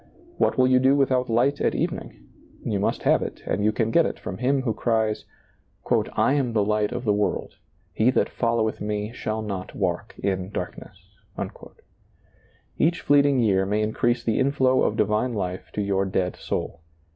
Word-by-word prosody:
What - - +2
will 130 - +5
you 130 0 +4
do 135 +2 +4
with 135 -2 +2
out 125 -1 +1
light 130 +5 +2
at - - +1
evening? - - -4 0.4
You 100 - 0
must 100 - -1
have - - +4
it - - -6
and 105 - -1
you 105 - +3
can 110 +1 -1
get - - +5
it - - -5
from 95 - -6
Him 130 +2 +1
who 115 -4 0
cries: 110 -1 0 0.5
" - - -1
I 135 - +3
am 135 -5 0
the 105 -2 +2
Light 105 0 +1
of 125 0 -4
the 105 -4 +2
world: 105 0 -1 0.4
he 110 +3 +3
that 130 - +2
followeth 115 -2 -1
me 105 +1 -3
shall 110 -2 -3
not 95 -3 -5
walk - - -2
in 95 -2 -2
darkness." - - -6 1.8
Each 170 +2 +2
fleeting 140 -2 +4
year 95 -4 +3
may 105 +2 +1
increase 120 +3 0
the 110 - 0
inflow 130 -1 +3
of - - +1
divine 105 +3 +1
life 90 -2 -4
to 105 - -1
your 100 -1 +1
dead 95 -1 -1
soul. 85 - -4
110 Hz, 185 wpm, -24 LUFS, 105-130 Hz, 1.8 s, will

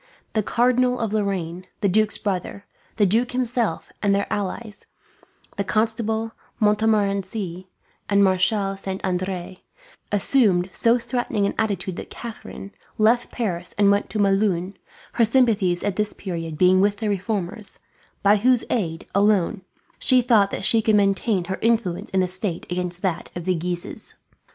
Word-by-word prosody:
The 215 - +2
Cardinal 250 +3 +2
of 225 -3 -2
Lorraine, 185 -4 -2
the 200 - +3
duke's 215 +3 +2
brother, 200 0 -4 0.3
the 210 - +3
duke 230 +6 +1
himself, 240 -7 -1
and 200 -1 +3
their 200 - 0
allies, 205 +2 -5 0.7
the 200 - 0
Constable 225 +1 -1 0.3
Montmorency 200 -3 0 0.4
and 200 0 +4
Marshal 195 +1 +2
Saint 195 -1 -4
Andre, 185 0 -3 0.5
assumed 200 -4 +2
so 230 +1 +3
threatening 240 -4 -1
an 200 - -1
attitude 200 -4 -1
that - - -7
Catharine 220 -3 -9 0.3
left 225 +3 +2
Paris 180 -7 -3
and 200 -1 +5
went 200 +1 +1
to - - -3
Melun, 195 -2 +1 0.4
her 235 - +3
sympathies 215 -7 +2
at 200 -2 -1
this 210 0 0
period 165 -5 -5
being 185 +2 +5
with 205 +1 +2
the 215 - -3
reformers; 205 +1 -3 0.4
by 205 +1 +5
whose 245 +3 +3
aid, 165 -8 -2
alone, 200 -1 +2 0.4
she 255 -1 +5
thought 220 -5 +4
that 195 - -4
she 225 +2 +3
could 215 0 +2
maintain 200 -1 +2
her 190 +2 -4
influence 225 -6 0
in 190 - +1
the 185 - +1
state 185 -1 -2
against 180 0 -3
that 180 -3 -2
of 175 -1 -5
the 185 - +2
Guises. 175 +1 -2
200 Hz, 150 wpm, -23 LUFS, 185-220 Hz, 0.7 s, and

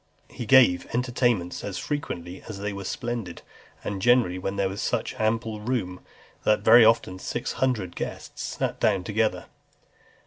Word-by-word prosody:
XXXII. - - -18
He 120 - -3
gave 120 -9 +5
entertainments 120 -7 0
as 100 -2 -4
frequent 145 - -4 0.2
as 105 - -6
they 100 +1 -3
were 100 0 -6
splendid, 115 -6 -4 0.4
and 100 -2 -4
generally 120 -6 +3
when 95 +2 -3
there 100 -1 +1
was 95 +1 -5
such - - -1
ample 110 0 0
room, 105 -6 -2 0.4
that 105 - +3
very 115 +1 +8
often 110 -4 +3
six - - -3
hundred 115 -9 -1
guests - - -6
sat - - -3
down 95 -2 +2
together. 110 +2 0
110 Hz, 160 wpm, -26 LUFS, 95-120 Hz, 0.4 s, very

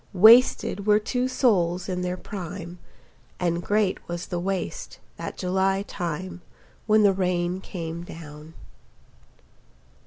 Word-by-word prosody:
Wasted 215 0 +5
were 210 0 +6
two 245 +4 -1
souls 185 -9 +1
in 180 -1 -2
their 180 0 -2
prime, 180 -2 -7 0.6
And 170 -1 0
great 205 +1 +1
was 175 0 -4
the 175 - -3
waste, 195 - -4 0.2
that - - -6
July 190 +1 0
time 180 -1 -5 0.5
When 215 0 +5
the 200 -1 +5
rain 180 -1 -1
came 170 -3 -6
down. 155 -2 -11
185 Hz, 120 wpm, -25 LUFS, 175-200 Hz, 0.6 s, were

